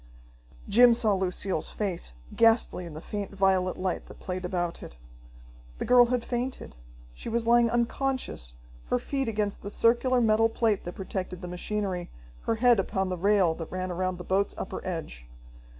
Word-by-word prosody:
Jim 240 +2 +7
saw 220 -3 +3
Lucille's 185 -2 -1
face, 185 - -3 0.2
ghastly 225 -6 +3
in 155 - -9
the 155 - -7
faint 205 +1 -5
violet 190 -1 +2
light 185 -1 -2
that - - -12
played 185 0 -4
about 175 -1 -2
it. - - -10 0.8
The - - -3
girl 245 -1 +6
had 245 -1 0
fainted. 245 - -4 0.4
She - - -7
was 230 0 -1
lying 235 0 +5
unconscious, 240 - -1 0.3
her 90 - +1
feet 270 - -2
against 210 -2 -1
the 200 - -6
circular 240 +4 +3
metal 225 -1 +4
plate 225 -3 0
that 175 - -6
protected 185 -2 -5
the - - -4
machinery, 180 0 -3 0.4
her 230 - +1
head 240 -1 +4
upon 190 0 -1
the 185 - -1
rail 195 -3 +3
that 165 0 -8
ran 185 0 -3
around 185 +1 -2
the 180 - -7
boat's 195 +3 0
upper - - -5
edge. 155 - -5
195 Hz, 170 wpm, -28 LUFS, 180-230 Hz, 0.8 s, Jim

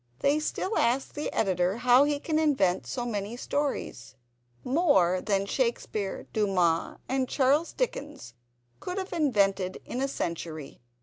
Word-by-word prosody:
They 285 +2 +3
still 375 +6 -2
ask 245 +3 +1
the 295 - -3
Editor 185 0 +1
how 250 +3 +5
he 290 -1 0
can 310 +1 0
invent 260 - +2
so 245 -2 -3
many 215 0 -3
stories—more 170 - -1
than 200 -2 0
Shakespeare, 220 -4 -2
Dumas, 180 -6 +1
and 260 -1 0
Charles 285 +4 +2
Dickens 125 - -4 0.5
could 360 +1 -5
have 380 -1 -4
invented 200 - +1
in 250 - -4
a 275 - +1
century. 165 - -5
230 Hz, 130 wpm, -28 LUFS, 180-285 Hz, 0.5 s, how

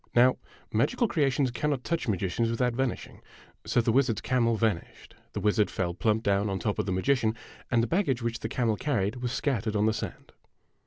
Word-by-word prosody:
Now, 125 +2 +5 0.4
magical 235 - +2
creations 140 - +1
cannot 140 +1 -1
touch 170 -4 -2
magicians 100 +2 0
without 120 +1 0
van 130 +2 +1
ishing. - - -9 0.5
So 120 - +3
the 115 - +1
wizard's 125 -3 +2
camel 115 -3 +2
vanished, 110 -6 -2 0.2
the - - -2
wizard 105 0 +2
fell 90 -2 -2
plump 110 +4 0
down 100 0 +1
on 95 - -1
top 105 +1 -2
of - - -1
the - - 0
magician, 110 +3 +1 0.3
and 115 -1 +3
the - - 0
baggage 135 - 0
which 115 0 -2
the 110 - -4
camel 115 -3 0
carried 115 -6 -1
was 125 -1 -3
scattered 115 -6 -1
on 105 0 +2
the 110 - +3
sand. - - -6
115 Hz, 200 wpm, -28 LUFS, 105-130 Hz, 0.5 s, Now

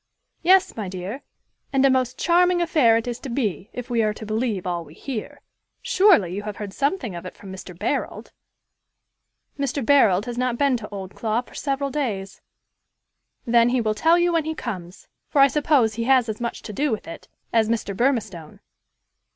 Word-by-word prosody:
"Yes, 370 +2 +4
my 210 -4 -4
dear; 190 +8 -6 0.5
and 270 -1 +3
a - - +6
most 255 -1 0
charming 355 +1 +3
affair 300 -9 +4
it 230 - -3
is 240 -1 -4
to 270 - -7
be, 220 -6 -2
if 250 -1 -7
we 235 -2 +1
are 215 -1 0
to 220 - -8
believe 215 -3 -2
all 175 -2 -2
we 155 0 -15
hear. 250 -6 -6 0.4
Surely 365 - +4
you 200 - -3
have 210 -1 -6
heard 205 -2 -6
something 275 - -1
of 170 - -7
it 185 - -9
from 195 - -11
Mr. 185 -2 -10
Barold." - - -3 1.3
"Mr. 275 -2 -1
Barold 215 -9 +4
has 245 0 -5
not 250 -1 0
been 280 -1 +2
to 215 -2 -9
Oldclough 215 +4 -3
for - - -18
several 275 -1 -2
days." 215 -10 -3 1.0
"Then, 235 0 +4
he 255 +1 +1
will 215 -2 0
tell 325 +10 +3
you 345 0 +2
when 325 -2 +1
he 315 0 -3
comes; 185 - -7 0.2
for 285 - +1
I 275 - +8
suppose 280 -5 +2
he 230 +2 -3
has 255 -2 +4
as 220 +1 -5
much 235 - -4
to 215 - -7
do 290 +8 0
with 220 - -3
it 165 - -9 0.3
as 225 -1 +3
Mr. 220 -4 -1
Burmistone." 215 - -1
235 Hz, 190 wpm, -23 LUFS, 205-275 Hz, 1.3 s, I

